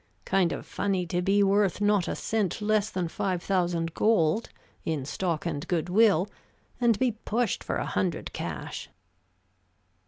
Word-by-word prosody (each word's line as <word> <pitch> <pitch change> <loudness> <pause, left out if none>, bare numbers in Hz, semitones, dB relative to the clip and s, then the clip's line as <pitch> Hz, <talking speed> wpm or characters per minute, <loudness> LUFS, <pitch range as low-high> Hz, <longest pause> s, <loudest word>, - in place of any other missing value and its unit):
Kind 185 -3 +2
of - - -5
funny 190 -3 -1
to 175 +1 -1
be 200 +2 +3
worth 200 -1 +2
not 205 -3 +2
a - - -2
cent 215 -4 -1
less 215 0 +1
than 180 -2 -2
five 180 +1 -2
thousand 175 -3 0
gold, 210 -1 +2 0.3
in 155 -5 -2
stock 170 +1 -2
and 150 -4 -3
good 175 -1 -1
will, 200 -2 +4 0.5
and 235 -4 +3
be 255 +1 +2
pushed 225 0 -1
for - - -2
a - - -1
hundred 180 -2 -2
cash." - - -5
190 Hz, 155 wpm, -28 LUFS, 175-210 Hz, 0.5 s, will